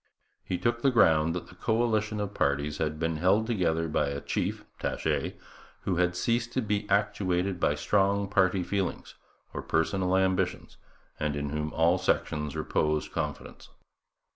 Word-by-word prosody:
He 90 - -2
took 120 +5 0
the 135 - +4
ground 80 -9 +4
that 90 - -4
the - - -13
coalition 110 +1 0
of 105 -1 -3
parties 70 +1 0
had 75 -1 -1
been 80 0 -1
held 95 +7 +3
together 85 -8 0
by 75 -2 0
a 70 0 -3
chief - - -2
(Taché) - - -1 0.5
who 95 -3 -1
had 90 0 +2
ceased 120 +5 0
to 130 - +1
be 105 0 -1
actuated 100 -3 +1
by 75 - +2
strong 100 +5 +1
party 95 -2 +2
feelings 100 0 -3 0.4
or - - -4
personal 95 +3 +1
ambitions 95 -1 0 0.4
and 75 -1 -1
in 70 0 -3
whom 75 0 -2
all 85 +3 +3
sections 75 -4 -1
reposed 75 0 0
confidence. - - -5
90 Hz, 155 wpm, -28 LUFS, 80-100 Hz, 0.5 s, the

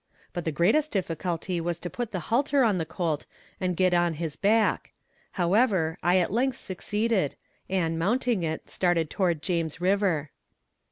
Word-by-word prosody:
But 175 - -4
the 160 - 0
greatest 215 - +2
difficulty 175 - -2
was 170 0 -2
to 175 - -6
put 235 +4 -4
the 185 - -3
halter 280 +2 +3
on 210 -6 +2
the 160 - -2
colt 165 -3 -2 0.3
and 180 -2 -1
get 185 -1 +3
on 175 -1 +2
his 160 -2 -4
back; 215 +5 +2 0.4
however, 180 -3 +2
I 175 +2 +3
at 180 -1 +1
length 255 +2 +1
succeed, 205 -2 -1 0.3
and, 165 -4 0
mounting 230 +3 +1
it, 160 -1 -3
started 175 -4 0
toward 170 -6 0
James 165 -3 -1
river. 180 -5 +1
180 Hz, 160 wpm, -27 LUFS, 165-205 Hz, 0.4 s, halter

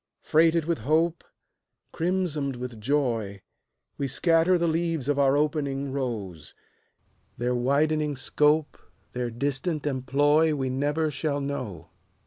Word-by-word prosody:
Freighted 165 0 +3
with 170 0 -1
hope, 160 +3 +1 0.7
Crimsoned 165 -6 -1
with 120 -3 -7
joy, 115 -7 -1 0.6
We 140 - 0
scatter 165 +5 +3
the 170 0 +1
leaves 165 -4 -1
of 145 -1 +1
our 140 0 +4
opening 140 -2 -1
rose; 105 - -5 0.8
Their 125 +1 0
widening 145 +4 +1
scope, 150 +3 +1 0.3
Their 125 -1 -2
distant 140 +5 -2
employ, 145 +3 +2
We 130 -2 -2
never 145 +4 0
shall 145 0 -2
know. 130 - -5
145 Hz, 115 wpm, -26 LUFS, 130-155 Hz, 0.8 s, our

